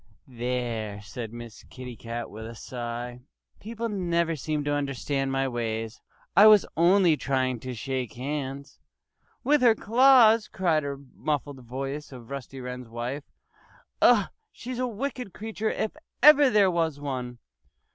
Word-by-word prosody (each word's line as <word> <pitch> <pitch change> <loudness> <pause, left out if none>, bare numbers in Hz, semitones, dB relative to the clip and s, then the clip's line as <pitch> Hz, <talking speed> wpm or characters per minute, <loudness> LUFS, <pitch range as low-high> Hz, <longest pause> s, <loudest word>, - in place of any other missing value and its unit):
"There!" 120 -4 -3
said 110 +2 -7
Miss 120 -2 -10
Kitty 125 -2 -9
Cat 115 +2 -6
with 110 +1 -8
a 115 - -9
sigh. 120 +1 -6 0.4
"People 230 +2 -4
never 170 -5 0
seem 150 0 -2
to 145 0 -1
understand 140 -1 -1
my 135 0 0
ways. 115 -2 -3 0.3
I 210 - +9
was 210 -2 +7
only 175 0 +5
trying 130 -3 -1
to 130 +1 -6
shake 130 0 -3
hands!" 140 +1 -5 0.6
"With 290 +2 +3
her 235 -3 +6
claws!" 230 -1 +5
cried 170 -5 +1
the 140 0 -6
muffled 145 -2 -2
voice 135 +5 -6
of 125 -1 -11
Rusty 135 -1 -7
Wren's 125 -1 -7
wife. 120 +5 -5 0.8
"Ugh! - - +5 0.2
She's 250 0 -7
a 255 - 0
wicked 250 -2 -5
creature 220 +1 -3
if 215 - -2 0.3
ever 290 -1 +8
there 205 -5 +4
was 165 -4 0
one." 130 -4 -4
140 Hz, 145 wpm, -27 LUFS, 125-195 Hz, 0.8 s, I